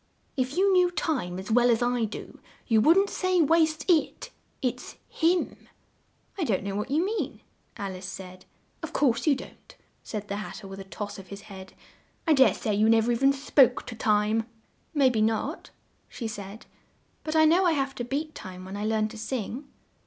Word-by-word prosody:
"If 260 Hz, +2 st, -2 dB
you 390 Hz, +1 st, +4 dB
knew 360 Hz, -1 st, +5 dB
Time 260 Hz, -, -2 dB
as 190 Hz, +4 st, -6 dB
well 245 Hz, +2 st, +5 dB
as 235 Hz, 0 st, +3 dB
I 240 Hz, -1 st, +1 dB
do, 215 Hz, -, -8 dB, 0.3 s
you 225 Hz, -3 st, +3 dB
wouldn't 380 Hz, -, +4 dB
say 370 Hz, -1 st, +1 dB
'waste 320 Hz, -1 st, +3 dB
it.' 365 Hz, +8 st, +1 dB, 0.3 s
It's 250 Hz, -2 st, -3 dB
him." 345 Hz, +2 st, 0 dB, 0.7 s
"I -, -, +1 dB
don't 205 Hz, -10 st, 0 dB
know 200 Hz, 0 st, -3 dB
what 210 Hz, -, -3 dB
you 310 Hz, +6 st, +2 dB
mean," 435 Hz, +3 st, -3 dB, 0.4 s
Al 200 Hz, -3 st, -4 dB
ice 185 Hz, 0 st, -7 dB
said. 185 Hz, -1 st, -9 dB, 0.4 s
"Of -, -, -6 dB
course 255 Hz, -1 st, +1 dB
you 290 Hz, -, +5 dB
don't!" 265 Hz, -, -12 dB, 0.3 s
said 210 Hz, -2 st, -6 dB
the 200 Hz, -, -3 dB
Hat 210 Hz, -, -6 dB
ter 195 Hz, -, -9 dB
with 195 Hz, 0 st, -9 dB
a -, -, -6 dB
toss 205 Hz, +1 st, -6 dB
of 190 Hz, -, -12 dB
his 200 Hz, 0 st, -9 dB
head. 190 Hz, -2 st, -11 dB, 0.5 s
"I 320 Hz, -, +4 dB
dare 265 Hz, -2 st, +5 dB
say 215 Hz, -, -2 dB
you 215 Hz, +2 st, +3 dB
nev 225 Hz, +1 st, +4 dB
er -, -, +4 dB
e -, -, +2 dB
ven 270 Hz, +3 st, +4 dB
spoke 270 Hz, -2 st, +3 dB
to 235 Hz, -, -7 dB
Time." 215 Hz, +1 st, +1 dB, 0.5 s
"May 270 Hz, -3 st, +5 dB
be 220 Hz, -3 st, 0 dB
not," 225 Hz, -, -1 dB, 0.4 s
she 230 Hz, -, -5 dB
said, 205 Hz, 0 st, -8 dB, 0.6 s
"but 310 Hz, 0 st, -3 dB
I 315 Hz, 0 st, +6 dB
know 345 Hz, +4 st, +4 dB
I 335 Hz, -, +3 dB
have 275 Hz, -2 st, -1 dB
to 245 Hz, -, -5 dB
beat 295 Hz, +5 st, -3 dB
time 185 Hz, -7 st, -9 dB
when 190 Hz, +1 st, -7 dB
I 205 Hz, +1 st, -3 dB
learn 215 Hz, 0 st, +1 dB
to 225 Hz, 0 st, -10 dB
sing." 250 Hz, +4 st, -4 dB
240 Hz, 205 wpm, -27 LUFS, 210-305 Hz, 0.7 s, I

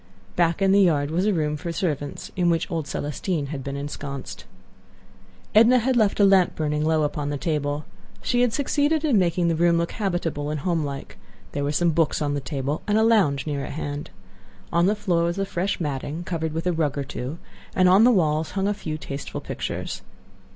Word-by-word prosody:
Back 170 Hz, +2 st, +2 dB
in 195 Hz, -, +4 dB
the 200 Hz, +1 st, +6 dB
yard 150 Hz, -5 st, +2 dB
was 180 Hz, +5 st, +1 dB
a -, -, +4 dB
room 150 Hz, -5 st, 0 dB
for 170 Hz, +3 st, -4 dB
servants, 150 Hz, -5 st, -3 dB
in 175 Hz, -2 st, +2 dB
which 165 Hz, -1 st, 0 dB
old 160 Hz, -4 st, -2 dB
Celestine 150 Hz, 0 st, -3 dB
had 135 Hz, -2 st, -5 dB
been 140 Hz, +1 st, -4 dB
ensconced. 140 Hz, -1 st, -6 dB, 1.1 s
Edna 230 Hz, +4 st, +7 dB
had 255 Hz, +2 st, +1 dB
left 215 Hz, -4 st, +2 dB
a 200 Hz, -, +7 dB
lamp 195 Hz, -2 st, +4 dB
burning 150 Hz, -1 st, -1 dB
low 155 Hz, 0 st, +2 dB
upon 145 Hz, 0 st, -2 dB
the 145 Hz, -, -2 dB
table. 145 Hz, -1 st, -2 dB, 0.4 s
She 245 Hz, -1 st, +1 dB
had 245 Hz, -2 st, +3 dB
succeeded 290 Hz, +4 st, +1 dB
in 255 Hz, -9 st, +4 dB
making 175 Hz, -1 st, +1 dB
the 165 Hz, -, +2 dB
room 170 Hz, +1 st, +3 dB
look 170 Hz, 0 st, -1 dB
habitable 175 Hz, -8 st, -2 dB
and 150 Hz, -1 st, -3 dB
homelike. 150 Hz, -5 st, -3 dB, 0.3 s
There 145 Hz, -, -2 dB
were 145 Hz, -, 0 dB
some 170 Hz, +3 st, +2 dB
books 160 Hz, -1 st, +1 dB
on 145 Hz, -1 st, -1 dB
the 145 Hz, -, -2 dB
table 140 Hz, +2 st, -3 dB
and 210 Hz, 0 st, +2 dB
a 220 Hz, -, +4 dB
lounge 190 Hz, -12 st, +3 dB
near 145 Hz, -3 st, -2 dB
at -, -, -6 dB
hand. 145 Hz, 0 st, -5 dB, 0.6 s
On 170 Hz, +2 st, +4 dB
the 210 Hz, -, +2 dB
floor 185 Hz, -5 st, 0 dB
was 170 Hz, +2 st, -1 dB
a 195 Hz, -, 0 dB
fresh 190 Hz, +1 st, -2 dB
matting, 150 Hz, +1 st, -3 dB
covered 160 Hz, -2 st, -2 dB
with 165 Hz, +2 st, -3 dB
a 180 Hz, -, +2 dB
rug 150 Hz, -4 st, 0 dB
or 140 Hz, -, -1 dB
two; 130 Hz, +3 st, -5 dB, 0.4 s
and 185 Hz, -1 st, +5 dB
on 190 Hz, +4 st, +6 dB
the 245 Hz, -, +7 dB
walls 155 Hz, -6 st, +1 dB
hung 195 Hz, +1 st, +1 dB
a 205 Hz, -, +1 dB
few 155 Hz, -6 st, -5 dB
tasteful 140 Hz, -2 st, -6 dB
pictures. -, -, -5 dB
165 Hz, 210 wpm, -24 LUFS, 145-190 Hz, 1.1 s, Edna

